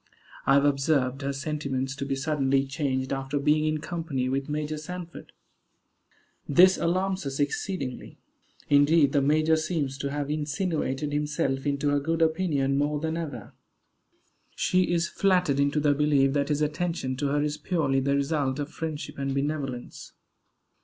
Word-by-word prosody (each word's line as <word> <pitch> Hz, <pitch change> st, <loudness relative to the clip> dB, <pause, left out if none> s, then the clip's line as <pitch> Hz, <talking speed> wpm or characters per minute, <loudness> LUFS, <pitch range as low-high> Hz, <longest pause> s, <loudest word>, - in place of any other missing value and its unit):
I 135 Hz, -, +6 dB
have 140 Hz, 0 st, +4 dB
observed 135 Hz, -2 st, +1 dB
her 140 Hz, 0 st, -1 dB
sentiments 140 Hz, -2 st, -3 dB
to 140 Hz, -, -3 dB
be 135 Hz, -, 0 dB
suddenly 135 Hz, -1 st, +1 dB
changed 135 Hz, -2 st, -2 dB
after 135 Hz, +1 st, -2 dB
being 150 Hz, +2 st, +2 dB
in 155 Hz, 0 st, +1 dB
company 160 Hz, -8 st, -3 dB
with 135 Hz, +2 st, -2 dB
Major 150 Hz, +1 st, -2 dB
Sanford. 175 Hz, +2 st, -8 dB, 1.2 s
This 185 Hz, +6 st, +7 dB
alarms 185 Hz, +3 st, 0 dB
us 135 Hz, +1 st, -4 dB
exceedingly. 145 Hz, -1 st, -3 dB, 0.5 s
Indeed, 145 Hz, 0 st, +5 dB
the 140 Hz, -, +2 dB
major 155 Hz, +3 st, +3 dB
seems 155 Hz, -4 st, -2 dB
to 140 Hz, -, -2 dB
have 145 Hz, 0 st, -3 dB
insinuated 150 Hz, -2 st, -2 dB
himself 145 Hz, -2 st, -1 dB
into 145 Hz, 0 st, 0 dB
her 145 Hz, 0 st, +2 dB
good 165 Hz, +3 st, 0 dB
opinion 155 Hz, -5 st, +1 dB
more 150 Hz, +1 st, 0 dB
than 160 Hz, +1 st, -2 dB
ever. 145 Hz, -10 st, -6 dB, 1.0 s
She 185 Hz, -1 st, +1 dB
is 170 Hz, -1 st, +1 dB
flattered 180 Hz, -8 st, +2 dB
into 140 Hz, +1 st, +2 dB
the 145 Hz, -1 st, +3 dB
belief 140 Hz, -2 st, +3 dB
that 140 Hz, 0 st, 0 dB
his 150 Hz, 0 st, +1 dB
attention 155 Hz, -3 st, -2 dB
to 145 Hz, +1 st, -1 dB
her 145 Hz, +1 st, +1 dB
is 150 Hz, 0 st, -2 dB
purely 150 Hz, -8 st, 0 dB
the 140 Hz, +1 st, +1 dB
result 140 Hz, -1 st, 0 dB
of 145 Hz, 0 st, -4 dB
friendship 155 Hz, -3 st, -5 dB
and 135 Hz, 0 st, -2 dB
benevolence. 140 Hz, -3 st, -4 dB
145 Hz, 155 wpm, -27 LUFS, 135-155 Hz, 1.2 s, This